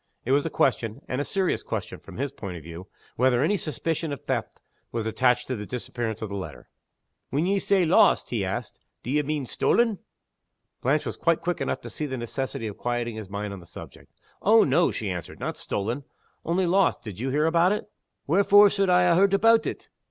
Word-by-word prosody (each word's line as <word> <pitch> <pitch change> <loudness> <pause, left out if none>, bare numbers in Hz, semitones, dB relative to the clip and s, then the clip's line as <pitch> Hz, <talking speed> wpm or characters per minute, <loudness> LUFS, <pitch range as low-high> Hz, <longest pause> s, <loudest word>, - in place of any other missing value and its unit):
It 130 - -1
was 145 +3 +3
a - - -2
question 115 -6 0
and 130 +2 -2
a - - 0
serious 190 +3 0
question, - - -5
from - - -12
his 140 +1 -2
point 95 -9 -7
of 80 - -11
view 85 +3 -9 0.3
whether 125 +1 +3
any 190 +7 +2
suspicion 160 -1 -2
of 140 - -5
theft - - -3 0.3
was 115 -2 -2
attached 125 +2 +2
to 130 - -3
the 105 -2 -6
disappearance 120 -3 -4
of 110 - -4
the 100 - -5
letter. 95 -2 -7 0.6
"When 150 +5 0
ye 195 +2 +2
say 190 -2 +2
'lost,'" 160 - +4
he - - 0
asked, - - -4 0.2
"d'ye 145 +5 +1
mean 150 -1 -2
stolen?" 225 - +1 0.8
Blanche 140 +4 +1
was - - -4
quite 170 -1 +1
quick 175 +1 -2
enough - - -2
to - - -8
see 150 - -3
the 130 -1 -4
necessity 120 0 -4
of 105 -2 -5
quieting 120 -1 -2
his 110 -3 -7
mind 100 0 -4
on 100 - -8
this 85 -1 -16
point. - - -11 0.3
"Oh 220 +3 +6
no!" 175 0 +3
she 105 -3 -3
answered. 90 -3 -6
"Not - - -3
stolen. 115 +8 -3 0.4
Only 180 +3 +1
lost. 190 +3 +2
Did 105 -4 -8
you 130 +3 -2
hear 150 +3 +1
about 170 +3 +3
it?" 210 0 -2 0.4
"Wherefore 200 +5 +6
suld 195 -2 +1
I 180 0 +5
ha' 170 - +4
heard 195 +2 +4
aboot 225 +2 +4
it?" - - -6
140 Hz, 210 wpm, -26 LUFS, 115-175 Hz, 0.8 s, Oh